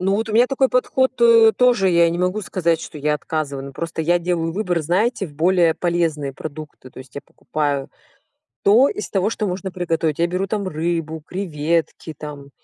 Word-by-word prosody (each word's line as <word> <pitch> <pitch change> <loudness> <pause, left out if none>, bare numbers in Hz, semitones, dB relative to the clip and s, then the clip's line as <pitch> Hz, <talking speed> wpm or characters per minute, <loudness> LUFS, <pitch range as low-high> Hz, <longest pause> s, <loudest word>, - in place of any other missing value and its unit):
Ну, 195 +2 +1
вот 225 +1 -2
у - - -4
меня 235 +3 +5
такой 265 0 +1
подход 260 +1 +1 0.4
тоже 245 -6 +3
я 170 -1 +4
не 170 - -3
могу 180 +4 0
сказать, 170 -4 0
что 150 - -9
я 150 +1 0
отказываю. 145 -3 -4
Ну 140 - -9
просто 165 +2 -4
я 175 +2 +2
делаю 170 -1 -1
выбор, 180 -3 -1
знаете, 195 +6 0
в 150 - -15
более 170 +1 +3
полезные 165 -5 -1
продукты. 150 -2 -9
То - - -14
есть, 130 0 -13
я 140 - -5
покупаю 145 -3 -3 0.7
то 230 +7 +6
из 420 0 -5
того, 195 +2 0
что 215 - -2
можно 190 0 -4
приготовить. 165 -4 -1
Я 170 - +3
беру 185 +3 -2
там 200 -1 -2
рыбу, 160 -1 -3
креветки, 165 -3 -2
там 145 -2 -9
170 Hz, 190 wpm, -20 LUFS, 155-195 Hz, 0.7 s, то